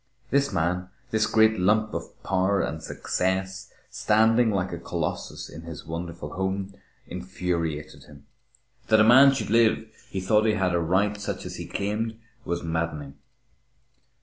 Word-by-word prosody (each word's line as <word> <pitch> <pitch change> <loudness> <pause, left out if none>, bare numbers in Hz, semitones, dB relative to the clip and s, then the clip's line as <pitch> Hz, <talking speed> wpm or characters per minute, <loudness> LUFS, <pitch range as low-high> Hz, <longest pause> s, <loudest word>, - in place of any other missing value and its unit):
This 140 0 +2
man, 90 0 -1 0.2
this 110 0 +2
great 110 -1 +4
lump 105 +3 +2
of - - -7
power 95 +1 +1
and 80 - -2
success, 95 +3 -2 0.2
standing 110 +2 +3
like 95 -3 -1
a 85 - -4
colossus 85 - -4
in 80 - -10
his 85 -1 -9
wonderful 85 -2 -6
home, 95 +1 -2 0.3
infuriated 85 -4 -4
him. 70 -1 -16 0.6
That 110 -1 +5
a - - +7
man 130 +5 +8
should 135 -6 -3
live 110 -1 +3 0.2
who 95 - -2
thought 105 +3 +3
he 110 - +3
had 95 -3 +1
a 85 - +2
right 95 +5 +1
such - - -4
as - - -6
he - - -6
claimed, 110 +3 -2 0.3
was 85 0 -2
maddening. 80 -4 -3
95 Hz, 150 wpm, -26 LUFS, 85-110 Hz, 0.6 s, man